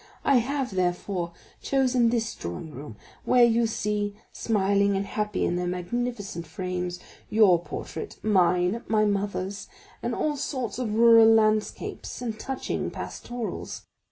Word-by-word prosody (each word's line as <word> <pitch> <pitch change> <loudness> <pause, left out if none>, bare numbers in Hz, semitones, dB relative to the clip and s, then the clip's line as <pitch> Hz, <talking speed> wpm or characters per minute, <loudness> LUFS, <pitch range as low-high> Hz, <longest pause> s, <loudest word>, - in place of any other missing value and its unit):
I 275 - +5
have, 265 +1 -1
therefore, 180 -1 -1 0.3
chosen 255 -3 +2
this 230 -1 -1
drawing 85 - -6
room, 140 -5 -9 0.3
where 250 -1 +5
you 235 0 +4
see, 210 -1 -2 0.2
smiling 200 -2 +2
and 195 - -1
happy 210 0 -1
in 175 - 0
their 180 0 -1
magnificent 195 -1 -3
frames, 180 +1 -4 0.3
your 200 -6 +5
portrait, 420 - -6
mine, 180 +1 +3
my 215 -1 +3
mother's, 200 -1 -2 0.3
and - - -2
all 300 -1 -1
sorts 255 -5 -3
of 220 -4 -2
rural 230 -1 +7
landscapes 215 -1 +1
and 225 -3 -4
touching 265 -1 -3
pastorals. 240 -2 -6
210 Hz, 130 wpm, -26 LUFS, 185-235 Hz, 0.3 s, rural